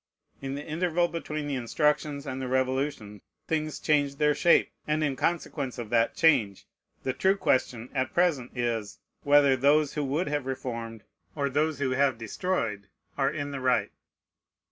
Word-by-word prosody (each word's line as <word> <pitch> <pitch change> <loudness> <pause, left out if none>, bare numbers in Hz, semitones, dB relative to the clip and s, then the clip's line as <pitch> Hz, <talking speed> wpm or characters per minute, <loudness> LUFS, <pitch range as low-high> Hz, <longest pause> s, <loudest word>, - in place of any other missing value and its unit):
In 135 0 -4
the 145 - -6
interval 175 +2 +1
between 155 -3 -4
the 145 - -3
instructions 145 +3 0
and 135 -1 -4
the 130 - -3
Revolution 130 -5 -1 0.3
things 155 -1 -2
changed 145 -2 +1
their 150 0 +3
shape; 170 - +3 0.2
and 155 +1 +1
in 140 -3 0
consequence 145 -4 -2
of 120 -2 -6
that 115 -1 +2
change, 125 - +2 0.4
the 130 - -1
true 190 +7 +2
question 125 - 0
at 130 -2 -1
present 150 -9 0
is, 115 -4 -2 0.2
whether 145 -2 +5
those 145 +3 +3
who 150 - -2
would 145 +6 -1
have 145 -2 -2
reformed 115 -4 -5 0.3
or 140 -2 -1
those 150 +2 +1
who 135 -2 -1
have 135 -2 +2
destroyed 115 - -2 0.3
are 135 -1 +2
in 145 -1 -4
the 140 - -4
right. 130 -1 +1
140 Hz, 165 wpm, -28 LUFS, 125-150 Hz, 0.4 s, whether